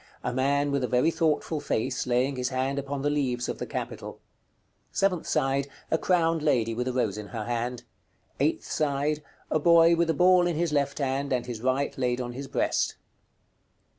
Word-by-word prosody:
_ - - -26 0.2
A 125 - -2
man 140 +2 +1
with 140 -2 0
a - - +1
very 125 +7 +3
thoughtful 160 -1 0
face, 130 -3 -2
laying 125 +3 +1
his 125 0 -1
hand 135 +1 -1
upon 140 0 -4
the 145 - +2
leaves 130 -4 -1
of - - -4
the - - -4
capital. - - -6 0.7
Seventh 190 -4 0
side. 140 -2 +1 0.2
A 160 - +2
crowned 165 -3 +2
lady, 125 -7 +2
with 125 +2 -2
a - - 0
rose 115 -5 -1
in 105 - -7
her 110 0 -5
hand. 120 +1 -3 0.6
Eighth - - +1
side. 150 0 0 0.3
A 155 - +2
boy 170 +1 +6
with 170 0 +1
a 165 - +2
ball 180 +1 +5
in 175 - -1
his 165 -1 0
left 140 -1 0
hand, 140 0 -1
and 125 -2 0
his 120 -3 -6
right 130 +3 0
laid 125 -1 0
on 120 -1 -4
his 135 +2 -6
breast. - - 0
140 Hz, 195 wpm, -27 LUFS, 125-155 Hz, 0.7 s, boy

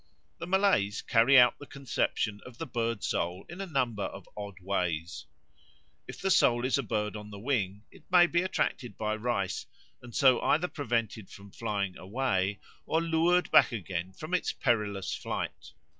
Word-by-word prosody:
The 165 - -5
Malays 185 - +2
carry 120 +4 +5
out 125 -1 +6
the 145 - -10
conception 115 -5 -2
of 125 -2 -12
the 165 - -4
bird 115 -6 -2
soul 90 +3 -2
in 175 +3 -8
a 195 - -4
number 125 - -1
of - - -8
odd 100 -2 -7
ways. 90 -3 -2 0.8
If - - -9
the 195 - 0
soul 120 -7 +4
is 130 - +2
a - - +2
bird 105 -1 -2
on 105 0 -8
the 100 - -9
wing, 105 -4 -1
it - - -18
may 175 -1 +7
be 170 0 +1
attracted 140 -8 -2
by 110 0 -1
rice, 110 -4 -2 0.3
and 120 -2 -11
so 130 -3 +5
either 160 +4 +2
prevented 115 - -2
from 100 0 -13
flying 100 -4 -3
away 100 -2 -1 0.3
or 160 - +2
lured 165 +2 +2
back - - +6
again 95 -5 -4
from 155 - -8
its 180 - +1
perilous 105 -6 -1
flight. - - -5
115 Hz, 175 wpm, -29 LUFS, 100-145 Hz, 0.8 s, may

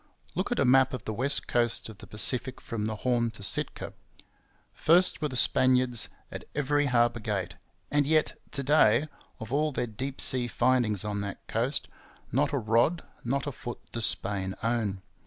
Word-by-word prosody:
Look 185 +6 -2
at 245 - 0
a - - +2
map 130 +1 +4
of 125 - -9
the 110 - -3
west 130 +6 0
coast 120 -1 +1
of 110 -3 -12
the - - -12
Pacific 125 +4 +2
from 110 -3 -4
the 110 - -3
Horn 120 -2 +2
to 100 - -11
Sitka. - - -1 0.8
First 175 +3 +3
were 150 - +1
the 130 - -7
Spaniards 125 -1 +3 0.2
at - - -7
every 145 0 +1
harbour 120 -2 +2
gate; 100 -5 -3 0.4
and 145 -1 +2
yet 155 0 +2 0.2
to 140 -2 -3
day, 140 -2 +4 0.3
of 110 +3 -7
all 150 +2 +1
their 130 - -2
deep 130 +5 -6
sea 125 -2 +3
findings 120 -5 +1
on 105 -1 -2
that 100 0 -7
coast, 125 +6 -1 0.4
not 145 +4 +1
a 145 - 0
rod, 115 +8 +1 0.2
not 135 +4 -1
a 145 - -3
foot, 120 -1 -7
does 115 -2 +3
Spain 95 -1 -1
own. 110 -5 -1
125 Hz, 180 wpm, -28 LUFS, 110-140 Hz, 0.8 s, map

